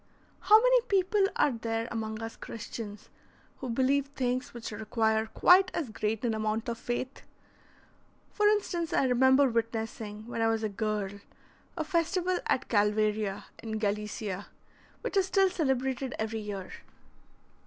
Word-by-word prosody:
How 430 +1 +7
many - - +5
people 390 -1 +3
are 290 - +3
there 225 -1 -2
among 220 -1 -4
us 225 0 -6
Christians 215 -2 -8 0.5
who 260 - -6
believe 265 +3 +2
things 255 -2 -2
which 235 -2 -7
require 220 +1 0
quite 365 - +5
as 285 -9 -2
great 215 +2 -2
an 230 - +1
amount 220 +1 -1
of 230 - -4
faith? 255 +2 -4 1.1
For 420 0 +2
instance, 365 -6 0
I - - +3
remember 260 +2 +5
witnessing, 225 -2 -3
when 235 -1 -4
I 225 - +3
was 225 0 0
a 215 - 0
girl, 205 -1 -2 0.6
a 320 - 0
festival 355 +2 0
at - - +1
Calvaria, 210 -1 +1 0.2
in 220 -1 -4
Gallicia, 210 -2 -3 0.5
which - - -4
is 385 -1 +3
still 385 -1 +3
celebrated 265 -5 -1
every 220 0 -2
year. 205 -3 -6
230 Hz, 145 wpm, -29 LUFS, 215-280 Hz, 1.1 s, How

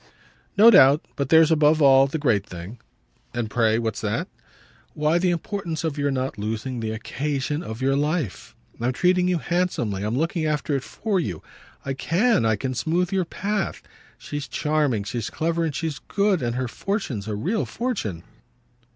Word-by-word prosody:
"No 225 +3 +9
doubt. 145 -7 +6
But 140 -2 -2
there's 160 0 +6
above 155 0 +4
all 135 -2 +6
the 140 - -3
great 120 -10 +1
thing." 90 +6 -9 0.6
"And 115 -2 -2
pray 115 -2 +2
what's 115 -2 -2
that?" - - -2 0.7
"Why 150 +3 +2
the 180 +1 +2
importance 175 -1 -3
of 160 -3 -1
your 145 -1 0
not 130 -4 -2
losing 115 +4 -3
the 110 -1 -3
occasion 140 +6 -3
of 115 -6 -6
your 135 +1 +2
life. 150 - -2 0.2
I'm 120 +2 0
treating 180 +5 +2
you 180 -1 +2
handsomely, 165 - -1
I'm 105 +4 -1
looking 165 +2 0
after 150 -1 -1
it 135 - -1
for 205 +5 -2
you. 90 - -4 0.4
I 135 - -1
CAN 180 - +2
I 110 - +3
can 130 +5 -3
smooth 165 +8 0
your 190 -2 +1
path. 200 +3 -3 0.3
She's 145 -1 -6
charming, 145 -4 0
she's 115 +1 -4
clever 165 +1 -1
and 155 -4 -2
she's 160 -3 -3
good. 200 -3 0
And 120 -1 -1
her 130 0 -1
fortune's 135 - -3
a 105 - -2
real 195 - -1
fortune." 145 - -3
145 Hz, 175 wpm, -24 LUFS, 120-170 Hz, 0.7 s, No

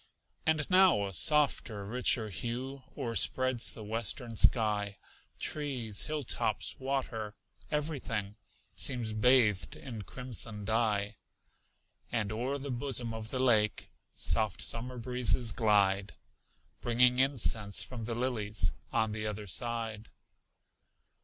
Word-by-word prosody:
And 155 -2 +2
now 185 - +5
a 95 - -6
softer, 125 - +2
richer 115 0 +1
hue 125 +7 -5 0.2
O'erspreads 130 -1 +1
the 110 - -8
western 115 +2 -2
sky; 105 -3 +2 0.4
Trees, 130 -8 -1
hilltops, 115 -9 -1
water 125 -6 -3 0.3
everything 130 -9 -2 0.4
Seems 120 -5 +2
bathed 110 -6 +3
in 115 -5 -8
crimson 115 -2 -7
dye. 105 -2 0 0.9
And 110 -4 -1
o'er 125 +6 -2
the 140 0 -5
bosom 120 -2 0
of 110 -1 -6
the 130 - -3
lake 110 -5 +2 0.2
Soft 110 -4 +1
summer 125 +2 -1
breezes 125 -1 +1
glide, 100 -3 +2 0.7
Bringing 125 +1 +4
incense 115 -6 +1
from 120 -4 -7
the 115 0 -3
lilies 110 -6 0 0.2
On 110 -1 +1
the 110 0 -3
other 105 0 -5
side. 115 +1 -2
115 Hz, 110 wpm, -31 LUFS, 105-130 Hz, 0.9 s, now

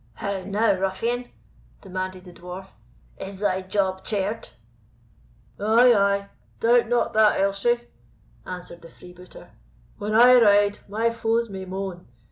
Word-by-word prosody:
"How 200 +4 -4
now, 205 +4 +1
ruffian!" 230 +6 -2 0.5
demanded 185 -1 -6
the 180 - -12
Dwarf, 180 +2 -9 0.5
"is 195 0 -7
thy 190 -2 0
job 190 0 -1
chared?" 205 +1 -3 1.1
"Ay, 230 +4 +5
ay, 200 -1 +1 0.3
doubt 235 0 +3
not 245 -1 +1
that, 215 -1 +4
Elshie," 200 +5 +1 0.6
answered 180 -1 -9
the 165 - -13
freebooter; 180 +2 -15 0.5
"When 210 +1 -2
I 245 +2 +7
ride, 205 -1 +4
my 225 +3 0
foes 230 -1 -1
may 190 -1 -6
moan. 190 -1 -6
200 Hz, 125 wpm, -24 LUFS, 190-225 Hz, 1.1 s, I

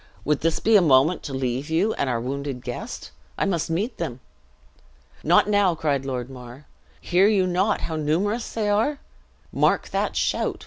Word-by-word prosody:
"Would 150 0 +1
this 165 0 0
be 225 0 +3
a 205 - +7
moment 155 +2 +4
to 145 - -5
leave 130 +2 -2
you, 180 +7 +1
and 135 - -2
our 120 -2 0
wounded 135 +1 -4
guest? 120 -1 -6 0.3
I - - +1
must 175 -5 -1
meet 200 +9 -2
them." 145 -8 -4 1.0
"Not - - +4
now!" 205 -4 +3
cried 140 -4 -1
Lord 125 -2 -3
Mar. 125 +1 -11 0.3
"Hear 185 +3 +3
you 200 -3 +3
not 185 +4 +1
how 160 - -3
numerous 185 +10 -1
they 220 -2 -2
are? 220 +8 +1 0.6
Mark - - +1
that - - -1
shout! - - -1
160 Hz, 175 wpm, -24 LUFS, 135-200 Hz, 1.0 s, a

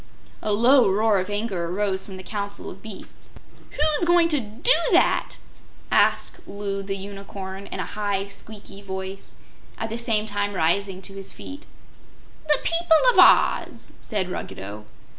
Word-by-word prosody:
A 215 - -1
low 240 +2 +5
roar 210 +1 +3
of 185 +2 -4
anger 205 -4 -2
arose 190 0 -1
from 190 -2 -8
the 185 - -9
Council 200 0 -4
of 190 - -12
Beasts. 215 -2 -11 0.4
"WHO'S 300 +1 +1
going 345 -1 +4
to 300 -3 +4
do 240 - +2 0.2
that?" - - +2 0.5
asked - - +2
Loo 200 -1 -4
the 195 0 -4
Unicorn, 195 0 -8
in - - -6
a - - -2
high, 200 -2 -2
squeaky 200 0 -11
voice, 190 0 -7 0.4
at 225 - -4
the 230 - -3
same 225 -3 +1
time 205 -1 -2
rising 190 +3 0
to 195 - -5
his 195 -1 -7
feet. 285 +2 -10 0.8
"The 300 - +4
people 335 -1 +3
of - - +2
Oz," - - +4
said 190 -5 -3
Ruggedo. 100 - -7
200 Hz, 155 wpm, -24 LUFS, 195-225 Hz, 0.8 s, low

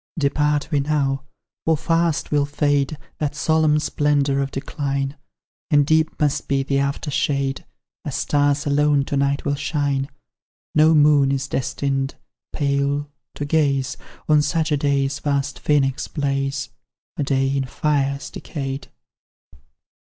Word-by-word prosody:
Depart 150 0 +1
we 145 - +2
now 140 -2 0 0.4
for 160 -1 +2
fast 165 0 0
will 145 -1 +2
fade 145 0 0 0.2
That 150 -1 -1
solemn 155 0 +3
splendour 145 -2 +1
of 140 0 0
decline, 135 0 -3 0.5
And 145 -1 +4
deep 155 +1 +1
must 145 -2 0
be 135 -1 +1
the 140 0 0
after 140 +2 -2
shade 140 -1 -1 0.4
As - - -4
stars 145 0 +1
alone 145 -1 +3
to 140 - -3
night 140 0 0
will 145 - +1
shine; 140 -1 -1 0.6
No 155 +1 +5
moon 145 -2 +5
is 135 0 -1
destined 135 +1 -2 0.4
pale 140 0 0 0.2
to 145 - -3
gaze 140 -3 +1 0.3
On 150 -1 +5
such 155 +2 0
a - - +4
day's 140 0 0
vast 140 -1 -1
Phoenix 135 -3 +1
blaze, 135 -2 -2 0.5
A - - -1
day 135 -1 +1
in 135 -1 0
fires 140 0 -1
decayed! 135 -3 -5
140 Hz, 135 wpm, -22 LUFS, 140-150 Hz, 0.6 s, No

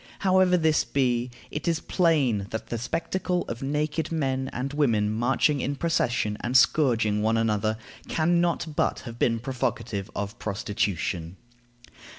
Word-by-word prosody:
However 185 -1 +4
this 160 -2 +3
be, 125 -3 0 0.2
it 150 - -4
is 165 -1 +2
plain 140 - +1
that 110 0 -5
the 120 - -2
spectacle 175 +7 -2
of 120 0 -5
naked 150 +3 -1
men 135 -4 -1
and 135 +3 -4
women 115 -8 +2
marching 125 +5 +1
in 140 - -1
procession 120 -9 0
and 125 +2 +3
scourging 115 -6 +3
one 110 +1 +2
another 110 -1 +1 0.3
can 170 +2 +2
not 170 -2 -1
but - - 0
have 120 -1 -9
been 115 -1 +2
provocative 115 -5 -3
of 100 +2 -4
prostitution. 95 -4 -2
125 Hz, 145 wpm, -26 LUFS, 110-155 Hz, 0.3 s, However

